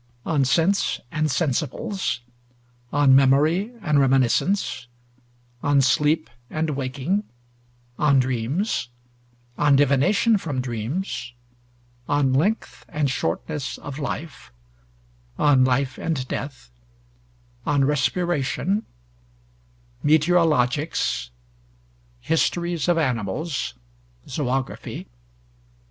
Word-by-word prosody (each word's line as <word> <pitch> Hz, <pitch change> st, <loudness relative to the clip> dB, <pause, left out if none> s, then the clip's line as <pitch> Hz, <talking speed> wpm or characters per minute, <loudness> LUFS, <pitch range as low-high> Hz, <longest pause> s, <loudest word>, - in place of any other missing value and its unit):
'On 150 Hz, -4 st, +2 dB
Sense 165 Hz, +9 st, +2 dB
and 155 Hz, 0 st, 0 dB
Sensibles,' 155 Hz, -, -1 dB, 0.7 s
'On 140 Hz, -2 st, +5 dB
Memory 150 Hz, -, +4 dB
and 150 Hz, -1 st, +3 dB
Reminiscence,' 135 Hz, +2 st, +2 dB, 0.7 s
'On 145 Hz, 0 st, +3 dB
Sleep 150 Hz, +4 st, +2 dB, 0.2 s
and 155 Hz, 0 st, -1 dB
Waking,' 140 Hz, +8 st, -1 dB, 0.8 s
'On 145 Hz, -2 st, +4 dB
Dreams,' 130 Hz, -, -1 dB, 0.7 s
'On 145 Hz, -1 st, +5 dB
Divination 145 Hz, -, +3 dB
from 145 Hz, -8 st, -3 dB
Dreams,' 125 Hz, -, -3 dB, 0.8 s
'On 145 Hz, -2 st, +2 dB
Length 195 Hz, +12 st, 0 dB
and 145 Hz, -3 st, 0 dB
Shortness 135 Hz, -, -3 dB
of 145 Hz, 0 st, -8 dB
Life,' 145 Hz, -, -5 dB, 0.9 s
'On 140 Hz, -3 st, +4 dB
Life 130 Hz, +1 st, +1 dB
and 135 Hz, -6 st, -2 dB
Death,' 130 Hz, -, -6 dB, 1.0 s
'On 140 Hz, -2 st, +3 dB
Respiration,' 165 Hz, +5 st, 0 dB, 1.2 s
'Meteorologics,' 150 Hz, -, +2 dB, 0.9 s
'Histories 170 Hz, -1 st, 0 dB
of 175 Hz, -1 st, +3 dB
Animals' 130 Hz, -, -2 dB, 0.5 s
(Zoögraphy). 130 Hz, -1 st, -3 dB
145 Hz, 80 wpm, -23 LUFS, 130-165 Hz, 1.2 s, On